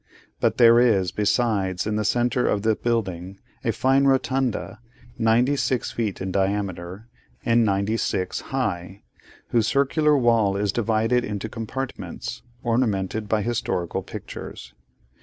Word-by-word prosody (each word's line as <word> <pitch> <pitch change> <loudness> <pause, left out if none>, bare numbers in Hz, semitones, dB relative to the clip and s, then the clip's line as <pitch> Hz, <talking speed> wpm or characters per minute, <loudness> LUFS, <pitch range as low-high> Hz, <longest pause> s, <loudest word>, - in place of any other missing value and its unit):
But - - +1
there 115 -1 +7
is, 100 -8 +3
besides, 105 -4 0
in 105 0 -1
the 105 - 0
centre 120 +3 +1
of 100 -1 0
the 110 -1 +3
building, 95 -6 -2 0.3
a 115 - +1
fine 135 +4 +2
rotunda, 130 -4 0 0.4
ninety 120 +5 +3
six 130 -3 -1
feet 110 -4 -2
in 95 0 -3
diameter, 95 0 -2 0.4
and 115 0 +4
ninety 100 +1 +1
six 95 -3 -2
high, 100 -7 -3 0.5
whose 115 -2 +2
circular 145 +3 +3
wall 115 -6 +3
is 100 -1 0
divided 115 +2 +1
into 105 0 -4
compartments, 115 +4 -6 0.2
ornamented 110 -3 0
by 110 -2 +1
historical 110 -7 -2
pictures. - - -9
110 Hz, 130 wpm, -24 LUFS, 100-120 Hz, 0.5 s, there